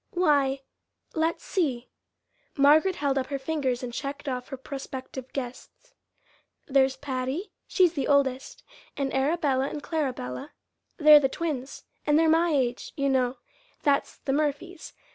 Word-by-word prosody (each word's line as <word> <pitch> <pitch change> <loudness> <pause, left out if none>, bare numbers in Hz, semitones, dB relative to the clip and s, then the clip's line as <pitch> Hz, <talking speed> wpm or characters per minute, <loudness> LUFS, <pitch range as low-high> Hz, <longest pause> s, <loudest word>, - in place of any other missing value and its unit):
"Why, 285 -6 +2 0.5
let's 325 +1 0
see." 265 -10 -1 0.7
Margaret 310 +7 +5
held 275 -2 0
up 260 - -3
her 280 - -2
fingers 265 -3 -2
and 240 -1 -5
checked 280 +3 -5
off 250 -2 -3
her 270 - -6
prospective 265 -1 -7
guests. 270 - -7 0.7
"There's 265 -1 +3
Patty, 270 +6 -3 0.2
she's 360 -3 +3
the 280 -5 -2
oldest, 270 -2 +1 0.3
and 275 -1 -1
Arabella 270 -1 +1
and 295 - -6
Clarabella 275 - -3 0.4
they're 300 -2 +9
the 270 -2 +1
twins 280 -4 -4 0.2
an' 295 - +4
they're 325 +1 +4
my 330 +2 +4
age, 255 -5 -1
you 275 -1 +1
know 255 -1 +1 0.5
that's 280 -1 +1
the 270 - -2
Murphys. 305 +4 -2
280 Hz, 140 wpm, -27 LUFS, 265-305 Hz, 0.7 s, they're